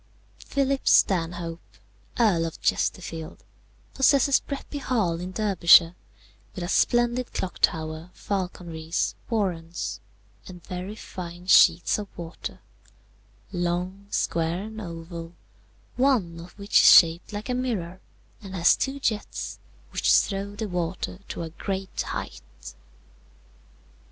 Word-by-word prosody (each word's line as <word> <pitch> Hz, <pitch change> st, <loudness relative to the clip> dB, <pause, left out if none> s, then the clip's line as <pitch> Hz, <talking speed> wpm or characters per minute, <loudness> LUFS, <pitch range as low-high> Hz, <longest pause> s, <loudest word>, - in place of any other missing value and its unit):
"Philip 275 Hz, -1 st, -1 dB
Stanhope, 170 Hz, -2 st, +1 dB, 0.4 s
Earl 180 Hz, -8 st, +3 dB
of 165 Hz, -, -9 dB
Chesterfield, 165 Hz, -3 st, -2 dB, 0.5 s
possesses 275 Hz, 0 st, +4 dB
Bretby 285 Hz, +1 st, -6 dB
Hall 210 Hz, -12 st, 0 dB
in 180 Hz, +1 st, -5 dB
Derbyshire, 180 Hz, -5 st, +5 dB, 0.6 s
with 185 Hz, -, -4 dB
a -, -, -3 dB
splendid 240 Hz, +3 st, +2 dB
clock 185 Hz, -, -4 dB
tower, 160 Hz, +1 st, 0 dB
falconries, 175 Hz, -4 st, -3 dB, 0.2 s
warrens, 180 Hz, -7 st, -2 dB, 0.5 s
and 180 Hz, -2 st, -11 dB
very 185 Hz, +3 st, -6 dB
fine 175 Hz, -4 st, -8 dB
sheets 175 Hz, 0 st, +5 dB
of 205 Hz, -, -5 dB
water, 170 Hz, -1 st, -7 dB, 0.9 s
long, 180 Hz, +2 st, -2 dB
square, 170 Hz, 0 st, -1 dB
and 220 Hz, +1 st, -7 dB
oval, 165 Hz, -2 st, -8 dB, 0.6 s
one 235 Hz, -11 st, +2 dB
of 175 Hz, +3 st, -12 dB
which 200 Hz, 0 st, +3 dB
is -, -, +6 dB
shaped 165 Hz, +3 st, +6 dB
like 205 Hz, 0 st, -5 dB
a -, -, +1 dB
mirror, 200 Hz, -8 st, -3 dB, 0.4 s
and 195 Hz, -2 st, -8 dB
has 175 Hz, -1 st, +5 dB
two 270 Hz, +1 st, -3 dB
jets, 220 Hz, -6 st, -3 dB, 0.3 s
which -, -, +1 dB
throw 200 Hz, 0 st, +2 dB
the 220 Hz, +1 st, -3 dB
water 180 Hz, 0 st, -3 dB
to -, -, -5 dB
a 160 Hz, -, -7 dB
great 190 Hz, +3 st, -4 dB
height. -, -, -7 dB
180 Hz, 115 wpm, -25 LUFS, 170-210 Hz, 0.9 s, is